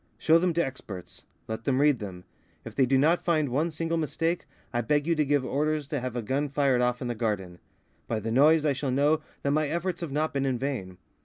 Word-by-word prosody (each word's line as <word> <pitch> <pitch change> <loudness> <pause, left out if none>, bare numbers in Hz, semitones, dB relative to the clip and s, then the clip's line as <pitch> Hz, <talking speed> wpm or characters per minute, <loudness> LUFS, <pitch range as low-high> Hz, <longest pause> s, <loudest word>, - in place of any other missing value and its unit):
Show 165 +1 +4
them 180 +1 +2
to 170 +1 +2
experts. 100 -9 -8 0.2
Let 110 0 -4
them 135 -1 +2
read 145 -3 +4
them. 95 -4 -7 0.4
If - - -7
they 135 -2 +3
do 135 +1 +3
not 160 +6 +3
find 155 -5 +1
one 150 +7 +1
single 165 +1 -2
mistake, 165 +3 -1 0.3
I 120 - +1
beg 145 +5 +1
you 170 - +2
to 155 -2 +2
give 145 -2 +1
orders 150 +3 0
to 145 - -1
have 125 -1 -4
a 120 - -2
gun 140 +6 -1
fired 135 -3 +2
off 125 +1 0
in - - -3
the 120 - -1
garden. 100 -6 -3 0.5
By 115 - -1
the 110 +2 -3
noise 150 +5 +5
I 145 - +3
shall 135 +1 -3
know 145 +4 +2 0.2
that 140 - +1
my 155 +1 +2
efforts 170 +3 -2
have 165 -4 -4
not 155 +3 0
been 135 -1 0
in 130 -2 0
vain. 115 -9 -4
140 Hz, 240 wpm, -27 LUFS, 125-155 Hz, 0.5 s, noise